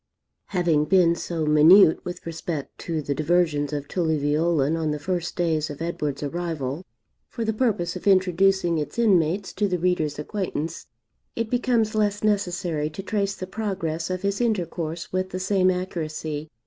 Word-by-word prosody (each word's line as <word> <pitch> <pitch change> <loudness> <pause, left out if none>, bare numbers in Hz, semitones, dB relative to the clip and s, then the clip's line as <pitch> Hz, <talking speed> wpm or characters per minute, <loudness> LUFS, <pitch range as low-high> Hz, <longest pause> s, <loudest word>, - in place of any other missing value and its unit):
Having 170 -6 +1
been 175 0 +4
so 170 -1 -3
minute 155 +4 +6
with 175 - -7
respect 165 -3 -5
to 160 -3 -3
the 140 - -1
diversions 155 -1 +1
of 145 -1 -4
Tully 160 -3 0
Veolan 150 +1 +1
on 160 -1 -1
the 150 - -1
first 175 +2 -3
days 160 -3 0
of 145 - -7
Edward's 150 -4 -3
arrival, 160 -1 -3 0.5
for 230 -2 -4
the 220 - 0
purpose 210 -7 0
of - - -6
introducing 185 -2 +3
its 150 - -5
inmates 195 -4 +2
to 205 - 0
the 180 -2 0
reader's 165 -4 0
acquaintance, 165 -1 -4 0.5
it 230 -1 -3
becomes 240 -3 +1
less 210 -1 0
necessary 180 -7 0
to 160 +5 -8
trace 200 -1 -1
the 185 - -6
progress 185 -5 -3
of 185 +1 -3
his 200 +3 -1
intercourse 170 -7 -2
with 185 0 -1
the 185 - -4
same 185 -1 +2
accuracy. 155 -4 -3
175 Hz, 160 wpm, -24 LUFS, 155-195 Hz, 0.5 s, minute